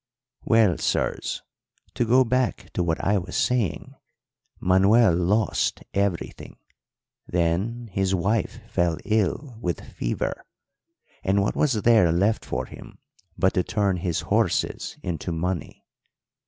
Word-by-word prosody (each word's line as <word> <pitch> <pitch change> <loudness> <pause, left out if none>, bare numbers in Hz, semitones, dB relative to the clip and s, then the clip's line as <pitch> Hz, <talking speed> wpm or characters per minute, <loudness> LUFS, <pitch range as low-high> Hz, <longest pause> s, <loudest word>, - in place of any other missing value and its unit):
"Well, 110 -6 +4
sirs, - - -1 0.5
to 120 - 0
go 130 +3 +5
back 120 -7 -1
to - - 0
what 80 -2 0
I 100 +1 +2
was 90 - -7
saying, 120 -9 0 0.7
Manuel 95 +3 +4
lost 95 +4 +1
everything; 100 -3 -2 0.7
then 90 +8 0
his 95 0 +1
wife 100 +4 -1
fell 85 -2 0
ill 110 - -1
with 90 -4 -2
fever; - - -3 0.8
and 100 +1 +2
what - - -1
was 130 -9 +1
there 110 -8 +5
left 100 +6 +1
for 65 +1 -3
him - - -12 0.4
but 95 - +2
to 90 - +1
turn 100 -3 0
his 85 -2 -1
horses - - 0
into 85 0 -3
money? 85 +1 -3
95 Hz, 125 wpm, -25 LUFS, 85-110 Hz, 0.8 s, go